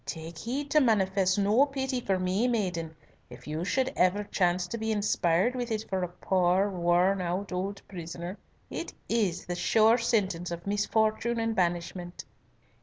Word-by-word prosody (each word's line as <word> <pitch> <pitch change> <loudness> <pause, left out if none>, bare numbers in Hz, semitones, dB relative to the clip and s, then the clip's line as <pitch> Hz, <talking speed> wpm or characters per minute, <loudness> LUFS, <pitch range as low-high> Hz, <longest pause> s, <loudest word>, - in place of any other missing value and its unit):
"Take 160 0 -7
heed 275 - -4
to 305 - +6
manifest 195 -5 +2
no 205 +6 +4
pity 265 -2 -2
for 195 -4 0
me, 185 +6 +1
maiden, 180 -9 -1 0.3
if - - -12
you 155 +3 -3
should 260 +7 0
ever 185 +3 +2
chance 180 -3 +1
to 230 +6 -5
be 220 0 -1
inspired 200 0 +2
with 245 -1 -3
it 220 0 -2
for 190 -1 -1
a 180 - -1
poor 185 +2 +1
worn 180 +2 +2
out 180 +3 -3
old 195 +2 -3
prisoner. 175 +1 -7 0.3
It - - -5
is 200 -7 0
the 175 - -3
sure 220 +6 +4
sentence 195 -7 0
of 170 0 -6
misfortune 220 +3 +1
and 225 0 -1
banishment." 175 -1 -2
195 Hz, 165 wpm, -28 LUFS, 175-220 Hz, 0.3 s, to